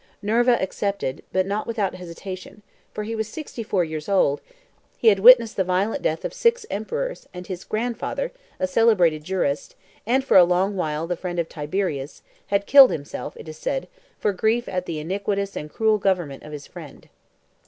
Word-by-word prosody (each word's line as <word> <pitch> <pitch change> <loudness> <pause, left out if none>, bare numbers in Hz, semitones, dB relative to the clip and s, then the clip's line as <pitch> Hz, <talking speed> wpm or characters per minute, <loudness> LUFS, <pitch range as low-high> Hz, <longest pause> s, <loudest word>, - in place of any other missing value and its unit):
Nerva 240 +3 +3
accepted, 190 -7 -2
but 185 0 +1
not 205 +2 -2
without 215 -5 -1
hesitation, 185 +3 -9 0.3
for 210 - -5
he 225 +2 -4
was 220 -1 -2
sixty 265 0 -7
four 200 -4 0
years 155 0 -5
old; 145 -8 +2 0.6
he 230 - +5
had 200 -2 +3
witnessed 235 +1 +7
the 190 - +3
violent 185 +4 0
death 160 +1 -1
of - - -3
six 475 -2 +2
emperors, - - -4
and 180 0 -7
his 185 -1 -6
grandfather, 245 - -3 0.3
a - - +1
celebrated 185 -6 +3
jurist, 155 -5 -2 0.3
and 260 +3 +2
for - - +5
a 180 - +10
long 180 +3 +1
while 155 -4 -2
a - - +1
friend 175 0 -5
of 170 -1 0
Tiberius, 150 -3 -3 0.2
had 200 0 0
killed 275 +1 +9
himself, 145 +1 -6
it - - -11
is 155 0 -9
said, - - -2 0.3
for 205 - 0
grief 220 +5 +1
at 180 -1 -3
the 165 - -3
iniquitous 200 +4 -2
and 150 0 -6
cruel 220 -1 +2
government 175 -8 -1
of 150 - -11
his 145 -2 -7
friend. - - -12
195 Hz, 185 wpm, -23 LUFS, 170-220 Hz, 0.6 s, a